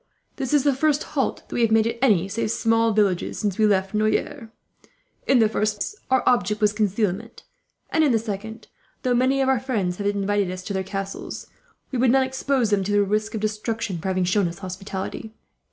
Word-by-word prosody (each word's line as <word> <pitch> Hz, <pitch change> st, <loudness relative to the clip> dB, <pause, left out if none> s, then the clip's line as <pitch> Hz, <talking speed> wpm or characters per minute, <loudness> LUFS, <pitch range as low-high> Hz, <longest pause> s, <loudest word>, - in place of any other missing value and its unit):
"This 265 Hz, -3 st, -3 dB
is 295 Hz, -3 st, +4 dB
the 285 Hz, -1 st, +3 dB
first 295 Hz, +2 st, +1 dB
halt 275 Hz, -3 st, -1 dB
that -, -, -10 dB
we 240 Hz, -, 0 dB
have 230 Hz, -, +4 dB
made, 220 Hz, 0 st, +4 dB
at 230 Hz, +1 st, -2 dB
any 200 Hz, -9 st, +3 dB
save 215 Hz, +2 st, -2 dB
small 225 Hz, 0 st, +2 dB
villages, 200 Hz, -4 st, +1 dB
since 205 Hz, -3 st, -2 dB
we 215 Hz, -, +5 dB
left 195 Hz, -1 st, +1 dB
Noyers. 220 Hz, +4 st, -1 dB, 0.8 s
In 270 Hz, -, +5 dB
the 225 Hz, -2 st, +5 dB
first 215 Hz, 0 st, 0 dB
place, 420 Hz, -, -4 dB
our 260 Hz, -1 st, +3 dB
object 210 Hz, -3 st, +2 dB
was 210 Hz, -1 st, +3 dB
concealment; 205 Hz, -2 st, -1 dB, 0.5 s
and 320 Hz, -, +3 dB
in 290 Hz, -, +3 dB
the 230 Hz, -, +4 dB
second, 220 Hz, 0 st, -6 dB, 0.4 s
though 250 Hz, -, +2 dB
many 260 Hz, +3 st, +2 dB
of 265 Hz, -, +1 dB
our 265 Hz, -2 st, +3 dB
friends 210 Hz, -9 st, -2 dB
have 200 Hz, -, -2 dB
invited 205 Hz, -1 st, 0 dB
us 185 Hz, 0 st, -6 dB
to 200 Hz, -, -5 dB
their 190 Hz, -, 0 dB
castles, 195 Hz, +1 st, -5 dB, 0.5 s
we 255 Hz, -, -2 dB
would 255 Hz, 0 st, +4 dB
not 265 Hz, +2 st, +4 dB
expose 260 Hz, -3 st, 0 dB
them 200 Hz, -2 st, +2 dB
to 200 Hz, -, -2 dB
the 205 Hz, 0 st, +4 dB
risk 215 Hz, +2 st, -1 dB
of 215 Hz, -, -3 dB
destruction, 215 Hz, -3 st, -2 dB
for 175 Hz, -, -5 dB
having 185 Hz, -1 st, +1 dB
shown 190 Hz, +1 st, +2 dB
us 170 Hz, 0 st, -6 dB
hospitality. 190 Hz, +3 st, -6 dB
215 Hz, 215 wpm, -23 LUFS, 195-245 Hz, 0.8 s, we